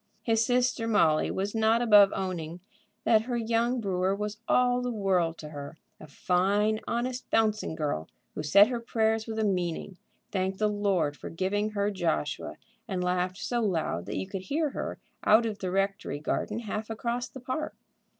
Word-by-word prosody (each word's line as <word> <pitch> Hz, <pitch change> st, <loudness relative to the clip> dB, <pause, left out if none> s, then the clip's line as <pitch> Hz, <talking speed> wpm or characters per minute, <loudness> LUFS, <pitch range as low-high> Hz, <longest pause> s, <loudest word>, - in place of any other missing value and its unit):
His 225 Hz, -1 st, +2 dB
sister 245 Hz, -1 st, +1 dB
Molly 165 Hz, -9 st, +3 dB
was 195 Hz, +2 st, -2 dB
not 225 Hz, +1 st, +3 dB
above 210 Hz, -4 st, +7 dB
owning 175 Hz, -3 st, -4 dB, 0.4 s
that 220 Hz, -2 st, +5 dB
her 245 Hz, -1 st, -1 dB
young 235 Hz, +2 st, +1 dB
brewer 190 Hz, -2 st, 0 dB
was 210 Hz, +1 st, -4 dB
all 250 Hz, 0 st, +3 dB
the 250 Hz, -, -2 dB
world 185 Hz, -7 st, +1 dB
to 150 Hz, -, -8 dB
her; 145 Hz, +1 st, -8 dB, 0.2 s
a 155 Hz, -, -11 dB
fine, 200 Hz, +8 st, +1 dB
honest, 250 Hz, +2 st, -2 dB
bouncing 215 Hz, -6 st, +1 dB
girl, 145 Hz, -, -2 dB, 0.2 s
who -, -, -4 dB
said 200 Hz, +8 st, +6 dB
her 245 Hz, -2 st, -2 dB
prayers 225 Hz, -1 st, 0 dB
with 220 Hz, -1 st, -4 dB
a 220 Hz, -, +1 dB
meaning, 180 Hz, -1 st, -2 dB, 0.3 s
thanked 190 Hz, 0 st, -1 dB
the 215 Hz, -, +2 dB
Lord 195 Hz, -8 st, 0 dB
for -, -, -8 dB
giving 200 Hz, +5 st, -1 dB
her 205 Hz, 0 st, 0 dB
Joshua, 170 Hz, -6 st, -2 dB, 0.3 s
and 185 Hz, -2 st, -2 dB
laughed 180 Hz, 0 st, 0 dB
so 240 Hz, +2 st, -1 dB
loud 165 Hz, -, -1 dB
that -, -, -3 dB
you 95 Hz, -, -2 dB
could 195 Hz, -, -5 dB
hear 295 Hz, -, -1 dB
her -, -, -4 dB, 0.3 s
out 220 Hz, +2 st, +5 dB
of 215 Hz, -3 st, -3 dB
the 185 Hz, -, -3 dB
rectory 195 Hz, -5 st, -1 dB
garden 210 Hz, +8 st, -2 dB
half 215 Hz, 0 st, -4 dB
across 235 Hz, +2 st, -3 dB
the 265 Hz, -, -10 dB
park. 260 Hz, +5 st, -4 dB
205 Hz, 180 wpm, -28 LUFS, 180-225 Hz, 0.4 s, above